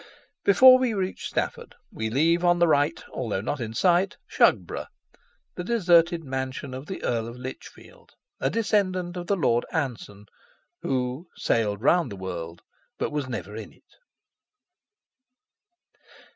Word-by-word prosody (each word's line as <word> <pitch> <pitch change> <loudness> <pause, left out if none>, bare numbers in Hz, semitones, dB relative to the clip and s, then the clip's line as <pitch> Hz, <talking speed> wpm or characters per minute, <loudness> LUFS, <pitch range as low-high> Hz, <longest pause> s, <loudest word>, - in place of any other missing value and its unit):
Before 255 +6 +8
we 250 -4 0
reach 190 -1 -3
Stafford - - -3 0.2
we 110 0 -3
leave 165 +8 +2
on 175 0 +4
the 175 - +4
right, 155 +1 +2
although 110 -6 -2
not 130 +8 -3
in 115 -2 -5
sight, 180 - +2
Shugborough, - - +1 0.7
the 180 - -5
deserted 175 -5 +3
mansion 130 0 -4
of 130 +3 -7
the 190 - -6
Earl 115 -2 -1
of 115 +1 -9
Lichfield, 130 +1 -11 0.3
a 135 - +1
descendant 185 -3 0
of 175 -1 -6
the 200 - +2
Lord 120 -9 +2
Anson 120 -9 -4 0.6
who 130 +5 -2
"sailed 105 -2 0
round 165 -3 +3
the - - -6
world 85 -3 -6 0.3
but - - -2
was 145 -3 -3
never 105 -4 -5
in 110 -2 -8
it." - - -25
140 Hz, 140 wpm, -25 LUFS, 115-175 Hz, 0.7 s, Before